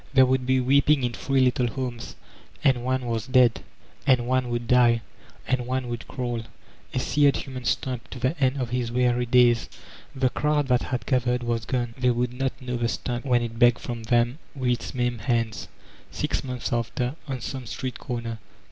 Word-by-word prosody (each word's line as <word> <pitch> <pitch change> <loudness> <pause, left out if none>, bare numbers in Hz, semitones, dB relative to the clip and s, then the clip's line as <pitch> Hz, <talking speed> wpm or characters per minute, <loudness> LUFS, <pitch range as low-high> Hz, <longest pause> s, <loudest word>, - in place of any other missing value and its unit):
There 130 -1 +8
woald 130 0 0
be 130 0 +3
weeping 140 +2 +3
in 120 -1 0
three 135 +2 +1
little 125 -1 +2
homes; 120 -1 -5 0.5
and 130 -4 +3
one 130 0 -1
was 115 -1 -2
dead, 125 -2 +4 0.5
and 125 -3 +4
one 130 0 +1
would 120 0 -2
die, 120 -1 +4 0.5
and 125 -2 0
one 130 -1 -2
would 120 -1 -5
crawl, 120 -2 -3 0.5
a - - -4
seared 145 +3 +3
human 130 -2 -6
stump, 125 -2 -2
to - - -8
the 130 +6 0
end 130 +1 +2
of 120 -2 -3
his 125 -2 -1
weary 125 0 +1
days. 120 -1 +4 0.5
The 130 -1 +1
crowd 150 -1 +1
that 125 -1 +3
had 120 -2 -3
gathered 125 -1 +1
was 115 -1 -1
gone; 120 -2 -2
they 125 0 +3
would 120 0 0
not 135 0 -2
know 125 -2 -3
the 120 0 0
Stump 120 +2 -3
when 120 -3 +3
it 115 0 -6
begged 120 -1 +6
from 120 -1 -5
them 120 +4 +2 0.2
with 130 -2 0
its 120 +2 -3
maimed 120 -2 -1
hands, 115 -2 -1 0.4
six - - -2
months 125 -1 -4
after, 125 +3 -1
on 135 -2 -3
some 130 +1 -6
street 125 +3 -5
comer. 115 -3 -4
125 Hz, 190 wpm, -25 LUFS, 120-130 Hz, 0.5 s, There